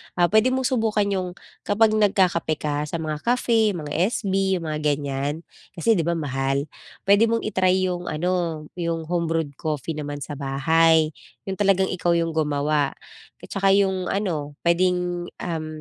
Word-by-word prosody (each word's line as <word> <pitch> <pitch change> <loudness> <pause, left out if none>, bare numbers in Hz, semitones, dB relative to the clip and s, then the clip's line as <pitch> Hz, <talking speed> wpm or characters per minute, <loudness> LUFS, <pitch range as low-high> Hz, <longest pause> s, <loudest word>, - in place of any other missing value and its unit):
Ah, 175 -1 +3
puwede 220 +3 +5
mong 260 0 0
subukan 220 -4 +1
'yong 185 -2 -1 0.4
kapag 215 +1 +4
nagkakape 185 -6 +2
ka 150 0 -1
sa 170 - -5
mga 155 -1 -3
cafe, 230 -3 +2
mga 150 -3 -6 0.2
SB, 195 -4 0
yung 170 - -4
mga 150 0 -2 0.2
ganyan, 145 +2 -3 0.3
kasi 185 +6 +2
di 170 -7 +2
ba 170 - +1
mahal? 135 -1 -1 0.3
Puwede 200 +3 +5
mong 230 0 0
i-try 185 -2 +2
'yong 180 -1 -2
ano, 170 -1 -1 0.2
'yong 165 -1 -2
home-brewed 165 -4 -1
coffee 155 0 -3
naman 145 -1 -5
sa 145 -1 -7
bahay, 160 +3 +3 0.3
yung 190 -1 -5
talagang 190 -2 +3
ikaw 175 -1 +1
yung 165 -1 0
gumawa. 150 -2 0 0.5
At - - -9
tsaka 195 0 +2
yung 190 -2 +1
ano, 155 -8 -2
puwedeng, 175 0 +1
um, 160 -3 -3
170 Hz, 160 wpm, -23 LUFS, 150-195 Hz, 0.5 s, puwede